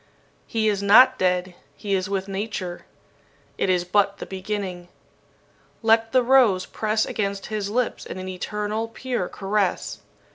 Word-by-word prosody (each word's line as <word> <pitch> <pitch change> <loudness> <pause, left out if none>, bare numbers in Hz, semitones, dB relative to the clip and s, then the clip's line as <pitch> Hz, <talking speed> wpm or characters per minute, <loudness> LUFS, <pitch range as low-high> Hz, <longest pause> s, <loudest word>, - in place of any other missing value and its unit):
He 220 -1 0
is 205 -2 +1
not 255 +6 +6
dead 180 0 +1 0.2
He 205 -2 -3
is 190 0 0
with 195 -1 -2
Nature. 195 -3 -5 0.7
It - - +1
is 180 -1 +2
but 200 +1 +2
the - - -7
beginning! 190 -2 -5 1.0
"Let 225 0 +3
the 255 0 +4
rose 240 -7 +4
press 215 0 -1
against 200 -2 -3
his 205 -2 -2
lips 245 +2 -1
in - - -7
an 185 0 -6
eternal, 210 +4 -3
pure 240 -4 -3
caress. 200 -1 -1
200 Hz, 145 wpm, -24 LUFS, 185-220 Hz, 1.0 s, not